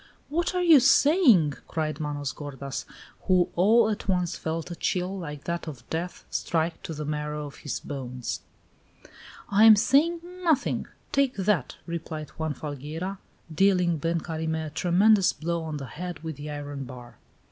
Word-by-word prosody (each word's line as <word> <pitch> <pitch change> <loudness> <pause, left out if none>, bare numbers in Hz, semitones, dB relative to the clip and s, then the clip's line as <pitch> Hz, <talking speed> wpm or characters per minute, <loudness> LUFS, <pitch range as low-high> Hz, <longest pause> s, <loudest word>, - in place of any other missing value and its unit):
"What 340 +4 0
are 360 - +1
you 325 -5 +8
saying?" 260 - +5
cried 155 -1 -2
Manos 145 -2 -3
gordas, 140 -2 -6 0.4
who 180 -2 +4
all 215 +5 +5
at 215 -2 -3
once 180 -3 +1
felt 165 +2 -4
a - - -4
chill, 180 +3 -1
like 150 -4 -7
that 170 0 -3
of 130 -6 -8
death, 170 +2 -4
strike 165 0 -1
to 160 - -6
the 150 0 -4
marrow 150 0 -3
of 145 - -10
his 145 - -4
bones. 125 -3 -5 1.1
"I 205 +2 +5
am 220 -1 +10
saying 285 +10 +3 0.2
nothing. 315 -6 +1 0.2
Take 275 -2 +2
that!" 190 -9 0
replied 160 -2 -5
Juan 160 -2 -3
Falgueira, 155 +7 -5 0.3
dealing 180 -1 +3
Ben 165 +3 0
Carime 160 -1 -3
a - - -5
tremendous 190 +4 +4
blow 170 +1 -2
on 155 -2 -4
the 140 - -6
head 170 +4 -7
with 160 -2 -4
the 145 +1 -7
iron 145 -2 -5
bar. 125 -1 -11
165 Hz, 160 wpm, -27 LUFS, 150-195 Hz, 1.1 s, am